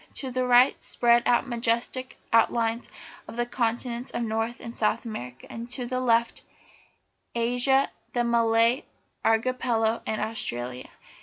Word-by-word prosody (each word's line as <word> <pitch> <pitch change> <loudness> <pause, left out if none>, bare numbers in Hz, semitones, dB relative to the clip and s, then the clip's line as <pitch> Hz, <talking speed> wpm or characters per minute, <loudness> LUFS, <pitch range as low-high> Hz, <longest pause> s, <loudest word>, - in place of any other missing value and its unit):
To 265 -2 -4
the 255 0 -1
right 250 +1 +5
spread 240 0 +3
out 240 - +4
the 270 - -11
majestic 235 +2 -1 0.2
outlines 230 0 +2 0.4
of - - -9
the 240 - +1
continents 240 +1 -2
of 240 - -3
North 225 +1 -2
and 230 0 -8
South 220 +2 0
America, 125 - -7
and 230 +1 -8
to 250 0 -3
the 255 +1 -2
left 235 -2 +1 0.9
Asia, 245 +3 +3 0.2
the 240 - 0
Malay 230 +1 +3 0.4
Archipelago, 225 -1 +1
and 220 - -1
Australia. 125 - -3
235 Hz, 140 wpm, -26 LUFS, 225-245 Hz, 0.9 s, right